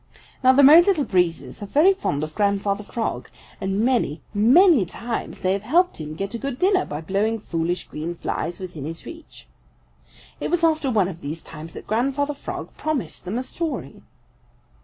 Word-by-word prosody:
Now 255 - +7
the 275 +2 +5
Merry 305 +5 +10
Little 345 -5 +2
Breezes 180 -6 -1
are 205 - -5
very 315 - +5
fond 145 - -2
of 155 0 -5
Grandfather 200 +1 0
Frog 225 +2 -4 0.3
and 195 +2 -1
many, 240 - +1
many 255 - +6
times 230 +6 -5
they 185 0 +2
have 200 - -2
helped 330 - +1
him 155 0 -6
get 195 +5 -4
a 235 - -4
good 275 -1 -4
dinner 375 +4 +2
by 150 +1 -5
blowing 200 +6 0
foolish 170 -2 -2
green 165 +3 -5
flies 170 0 -3
within 175 -7 -7
his 165 +2 -7
reach. 325 -2 -12 0.9
It - - -3
was 350 -1 0
after 310 -4 +2
one 210 -7 +2
of 175 -3 -8
these 155 +3 -6
times 160 +2 -10
that - - -9
Grandfather 275 +6 0
Frog 280 - -7
promised 275 - -3
them 195 +6 -3
a 255 - -2
story. 325 +4 -5
210 Hz, 180 wpm, -23 LUFS, 175-285 Hz, 0.9 s, Merry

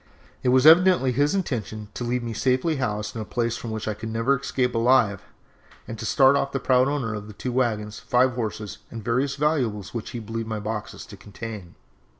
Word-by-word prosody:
It 125 - +1
was 130 +2 +4
evidently 170 -4 +6
his 145 +7 +1
intention 110 - -3
to - - -5
leave 120 0 -1
me 115 -1 -4
safely 130 +7 +1
housed 105 -4 -2
in 110 - -3
a - - -3
place 115 +1 -1
from 120 - -6
which 110 -1 -4
I 110 - 0
could 110 +2 -7
never 115 +5 +1
escape 125 -2 -1
alive, 115 -4 +3 0.7
and 115 -1 -7
start 135 0 +4
off 140 0 0
the 135 - 0
proud 130 0 +3
owner 135 -6 -1
of 105 -1 -6
the 105 - -10
two 125 +4 -4
wagons, 110 -4 -1
five 125 +1 +2
horses, 110 -3 -4
and 115 -2 -8
various 130 +4 0
valuables 125 -9 -1
which 115 -3 -5
he 120 - -5
believed 115 0 -5
my 110 -1 -2
boxes 105 0 -5
to - - -11
contain. 105 -4 -9
120 Hz, 205 wpm, -24 LUFS, 110-130 Hz, 0.7 s, evidently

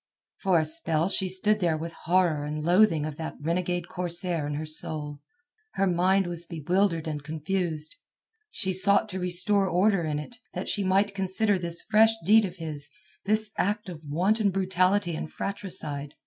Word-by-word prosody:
For 190 -3 +2
a 160 - +2
spell 160 +1 +1
she 190 -1 +1
stood 210 +3 +2
there 170 -4 +1
with 165 +2 -5
horror 170 -4 +1
and 150 +1 -4
loathing 175 -2 +3
of 155 -1 -6
that 160 - -5
renegade 175 +2 -2
corsair 175 -3 -1
in 145 - -3
her 155 +2 -4
soul. 150 -1 0 0.5
Her 195 - +1
mind 185 +2 +2
was 175 -1 -4
bewildered 165 +1 0
and 150 -2 -4
confused. 160 0 -2 0.5
She 190 - -2
sought 200 +3 +3
to 190 -1 -4
restore 185 +3 +1
order 185 +1 +2
in 155 -2 -2
it, 150 +11 -8 0.2
that - - -4
she 205 - 0
might 195 +2 +2
consider 195 +1 +1
this 170 -1 -2
fresh 220 +1 +5
deed 215 +3 +6
of 180 -2 -6
his, 155 -4 -3 0.4
this 215 +1 +4
act 210 +1 -1
of 165 -3 -9
wanton 195 +9 +1
brutality 185 -1 +1
and 155 - -6
fratricide. 155 -8 -5
180 Hz, 170 wpm, -27 LUFS, 160-195 Hz, 0.5 s, deed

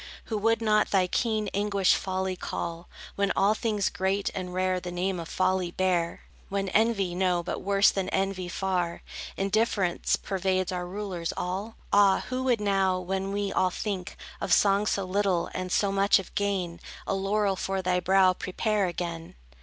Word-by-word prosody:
Who 220 - -3
would 225 +2 +2
not 215 -1 +3
thy 190 -2 +3
keen 215 +2 0
anguish 200 -2 +2
folly 190 -1 -1
call, 170 -1 -5 0.3
When 200 -1 +1
all 200 +2 +4
things 215 -3 -1
great 190 +2 0
and 185 -1 -4
rare 185 0 0
the 180 0 -6
name 180 +1 -1
of 165 - -7
folly 185 -1 +1
bear? 175 -2 0 0.3
When 195 -1 -1
envy, 200 -3 +2
no, 180 -1 +1
but - - -4
worse 200 0 +4
than 195 -1 -2
envy, 190 -2 -1
far, 180 -2 -2 0.3
Indifference 195 -2 +1
pervades 185 -1 -1
our 180 -1 -3
rulers 185 -3 -4
all? 195 +5 -3 0.2
Ah, 200 -1 +5
who 255 0 -2
would 245 -3 +2
now, 195 -2 +1
when 190 +2 -3
we 200 0 -2
all 185 - +3
think 190 -1 -4 0.2
Of - - -2
song 200 +1 +4
so 200 - 0
little, 190 -2 0
and 185 0 -4
so 200 +1 +2
much 195 +1 +4
of 195 - -7
gain, 190 -4 -1 0.3
A - - -1
laurel 195 +1 +1
for 190 0 -2
thy 180 0 +2
brow 185 +1 +4
prepare 205 +2 -1
again? 170 -1 -5
190 Hz, 170 wpm, -27 LUFS, 180-200 Hz, 0.3 s, Ah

